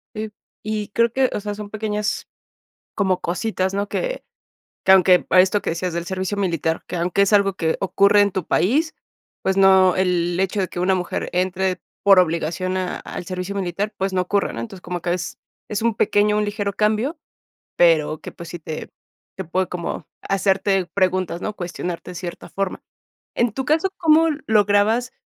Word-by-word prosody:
Eh, 215 0 -4 0.3
y 210 -1 -3
creo 230 +2 +2
que, 260 +1 +2
o - - -1
sea, 205 0 -4
son 210 0 -7
pequeñas 210 0 -2 0.7
como 190 -3 +1
cositas, 190 +1 -1
¿no? 200 +1 -1
Que - - -3 0.6
que - - +3
aunque 185 -1 +6
a 185 - +7
esto 190 +2 +2
que - - -1
decías 175 +2 -2
del 170 +1 -3
servicio 190 +2 -2
militar, 165 -4 -1
que - - -4
aunque 175 +3 +1
es 200 - +2
algo 200 -1 +4
que 160 -4 0
ocurre 200 +2 +4
en 205 -1 +3
tu 185 -2 -2
país, 300 - +1 0.5
pues, 190 0 0
no, 190 -1 +6
el 175 -2 +1
hecho 190 +2 0
de 190 - +1
que 175 - -5
una 185 +1 +2
mujer 180 -1 -3
entre 185 0 0 0.2
por 195 -1 +7
obligación 170 +2 0
a 185 -1 -2
al - - -7
servicio 185 +2 -4
militar, 195 +2 -2
pues, 195 0 -1
no 185 - +1
ocurre, 200 +2 0
¿no? 115 - -5
Entonces, 115 +11 -7
como 175 0 -4
que 175 - -1
es 180 - -5 0.3
es 210 0 -2
un 230 -1 +2
pequeño, 210 0 +2
un 210 - +1
ligero 205 -1 -2
cambio, 215 - 0 0.6
pero 160 -3 +3
que, - - -8
pues, 170 - -10
sí 175 - -6
te 155 -1 -7 0.5
te 190 - -4
puede 185 +3 0
como 175 -1 -5 0.2
hacerte 195 -1 +1
preguntas, 185 -2 0
¿no? 210 - -4
Cuestionarte 175 -1 -5
de - - -11
cierta 175 0 -7
forma. 195 -1 -3 0.5
En 235 -2 +2
tu 265 +4 -3
caso, 320 +6 +2
¿cómo 325 0 +5 0.2
lograbas 215 +3 +3
190 Hz, 190 wpm, -21 LUFS, 180-210 Hz, 0.7 s, a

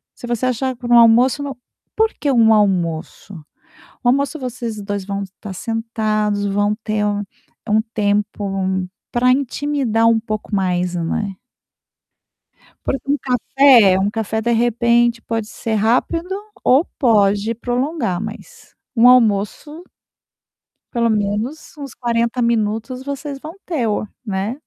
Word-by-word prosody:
se - - -9
você 240 +1 -1
achar 255 +1 -1
para 240 0 -6
um 240 - +8
almoço 235 +4 +5
no 280 -2 -5 0.4
por 445 0 +2
que 285 -2 +1
um 225 -3 +5
almoço? 185 -2 0 0.7
O 245 - +3
almoço 280 +3 +1
vocês 235 -5 -5
2 200 -1 -4
vão 200 0 -3
estar 195 +1 -9
sentados, 215 -1 -1
vão 205 +1 +1
ter 215 -1 -1
um 205 0 -1 0.5
um 215 +1 +3
tempo 200 -2 -1 0.3
pra 250 +1 +2
intimidar 270 -3 0
um 230 -1 +4
pouco 215 -1 -5
mais, 180 -2 0
né. 185 +4 -2 1.5
Porque 270 +1 -3
um 290 - +2
café 250 -5 +4
um 195 +1 +1
café, 220 0 -2
de 235 - 0
repente, 235 0 +2
pode 225 -2 -3
ser 225 0 -4
rápido 330 - 0 0.3
ou 270 +7 +4
pode 210 -3 +3
prolongar, 245 - -2
mas 240 - -10 0.2
um 235 +2 +6
almoço 250 - +2 1.1
pelo 235 -1 +1
menos 215 +9 -2
uns 280 -4 -8
40 235 0 -1
minutos 230 +2 -1
vocês 280 0 -5
vão 310 +3 -9
ter 295 -10 -1
o 210 0 -2 0.2
né. 200 +3 -2
230 Hz, 135 wpm, -19 LUFS, 205-255 Hz, 1.5 s, um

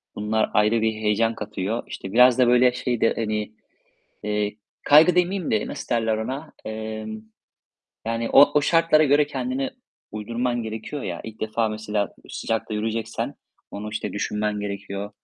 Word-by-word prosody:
Bunlar 110 +1 0
ayrı 105 +2 +3
bir 110 0 +1
heyecan 110 +1 +1
katıyor. 105 +1 -3
İşte, 95 - -7
biraz 125 +1 +6
da, 125 - +5
böyle, 125 0 +5
şey 125 -1 -2
de, 115 - +4
hani, 110 -1 -2 0.7
eee, 105 0 -1 0.3
kaygı 160 +4 +7
demeyeyim 180 0 +1
de 110 - +1
nasıl - - -7
derler 110 -1 +1
ona? 135 +8 -5
Emm, 110 0 -5 0.8
yani 115 0 -1
o 145 +1 +7
o - - +2
şartlara 165 -1 +4
göre 145 +1 +4
kendini 265 - -2 0.4
uydurman 120 +3 -2
gerekiyor 110 +6 -5
ya. 85 -2 -4
İlk 110 -1 -9
defa 110 +1 0
mesela 105 -1 -2
sıcakta 110 -1 -3
yürüyeceksen 110 +1 -3 0.4
onu, 105 +1 -6
işte, 110 - -3
düşünmen 105 0 -2
gerekiyor. 100 0 -5
110 Hz, 150 wpm, -24 LUFS, 105-125 Hz, 0.8 s, kaygı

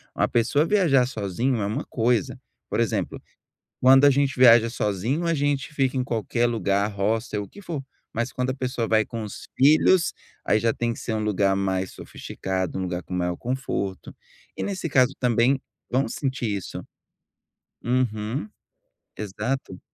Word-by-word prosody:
Uma - - +2
pessoa 125 +6 +2
viajar 165 -10 +3
sozinho 115 +1 -1
é - - 0
uma 110 +9 -3
coisa. 115 -3 0 0.3
Por - - -1
exemplo. - - -1 0.6
Quando 135 +2 +7
a 145 - +8
gente 140 0 +1
viaja 115 -2 +7
sozinho, 115 - -1
a 170 - +2
gente 145 -1 -1
fica 135 -3 0
em 130 - +1
qualquer 120 -1 -1
lugar, 100 -4 +1
roça 105 +3 -1
e - - 0
o 100 - -5
que 205 - -14
for. 165 -7 -4 0.3
Mas 120 +2 -1
quando 125 -1 -2
a - - 0
pessoa 130 -3 -2
vai 110 -1 +3
com 115 -1 -5
os 105 - -8
filhos, 155 +5 +4 0.3
aí 110 - +3
já 115 0 +1
tem 120 0 -1
que 115 - -6
ser 115 - -3
um 110 0 -1
lugar 100 -2 +2
mais 95 -1 -1
sofisticado, 95 -1 -4
um - - -2
lugar 90 -1 -3
com - - -8
maior 90 -1 -1
conforto, 120 -6 -3 0.4
e - - -2
nesse 185 -4 -3
caso 130 -1 +4
também, 125 +2 +2 0.3
vão 130 0 +1
sentir 130 -1 -2
isso. 95 - -7 1.0
Uhum, 120 -1 -1 0.7
exato. 105 0 -4
120 Hz, 170 wpm, -24 LUFS, 105-135 Hz, 1.0 s, a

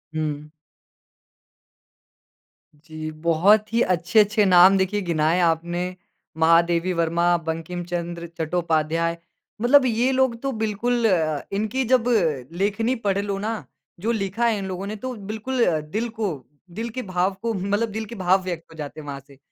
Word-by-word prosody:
हुँ। 150 -1 -3 2.3
जी, 155 +1 -8
बहुत 170 +7 +3
ही 235 - +3
अच्छे-अच्छे 205 +4 +3
नाम 185 +1 +7
देखिए 195 +2 0
गिनाए 165 0 +1
आपने, 175 +2 0 0.4
महादेवी 170 +2 +3
वर्मा, 170 +1 +1
बंकिमचन्द्र 170 +1 -4
चट्टोपाध्याय 165 0 0 0.4
मतलब 260 +2 +5
ये 245 +2 +2
लोग 260 -2 +2
तो 275 0 -1
बिल्कुल 225 +2 0
अ, 155 -5 +1
इनकी 220 +6 -1
जब 250 -1 +3 0.6
लेखनी 225 +5 +1
पढ़ 195 -1 +2
लो 200 -1 -2
ना, 220 +1 -3 0.3
जो 225 +5 -1
लिखा 215 +2 -1
है 220 -2 +1
इन 195 - -4
लोगों 190 +1 -5
ने 215 - -4
तो 255 +4 -5 0.2
बिल्कुल 240 +3 -1 0.3
दिल 230 +3 -1
को, 220 -3 -2 0.4
दिल 225 +7 -5
के 255 +3 -5
भाव 185 -1 0
को 230 -1 -1
मतलब 205 +4 -1
दिल 220 +1 -4
के 235 - -9
भाव 185 0 +2
व्यक्त 175 -3 -4
हो 160 - -14
जाते 150 +1 -7
हैं 145 - -10
वहाँ 140 -1 -5
से। 140 -1 -17
185 Hz, 150 wpm, -23 LUFS, 170-220 Hz, 2.3 s, नाम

